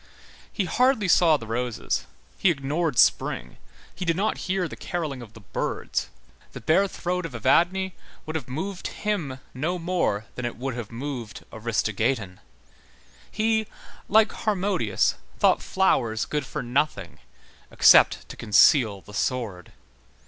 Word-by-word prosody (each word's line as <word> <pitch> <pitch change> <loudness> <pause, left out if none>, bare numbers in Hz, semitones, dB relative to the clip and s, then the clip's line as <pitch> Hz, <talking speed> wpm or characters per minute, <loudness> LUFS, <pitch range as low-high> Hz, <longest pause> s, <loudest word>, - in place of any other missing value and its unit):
He 200 - -1
hardly 250 0 +2
saw 165 -3 +5
the 115 - -9
roses, 120 +1 -2 0.3
he 190 - +3
ignored 150 -1 -1
spring, - - +2 0.4
he 185 - -6
did 165 -2 +1
not 205 +5 -1
hear 185 -1 +1
the - - -8
carolling 155 -8 -4
of 115 -2 -12
the 115 - -13
birds; 100 - -3 0.4
the - - -7
bare 190 +6 +3
throat 180 -1 -3
of 160 -7 -6
Evadne 185 - +2 0.3
would 155 - -5
have 150 -6 -3
moved 185 +8 -4
him 175 -11 -3 0.2
no 160 +8 -2
more 170 - -1
than 125 - -6
it 120 - -4
would 130 +1 -3
have 115 -3 -6
moved 120 -2 -6
Aristogeiton; 110 -2 -1 0.9
he, 220 0 +1 0.4
like 220 +1 +5
Harmodius, 190 - 0 0.2
thought - - +3
flowers 120 -12 +1
good 150 -3 -3
for - - -4
nothing 125 - -1 0.5
except - - +5
to - - -8
conceal 105 -1 +4
the 105 - -14
sword. 105 -6 -2
145 Hz, 140 wpm, -25 LUFS, 115-185 Hz, 0.9 s, saw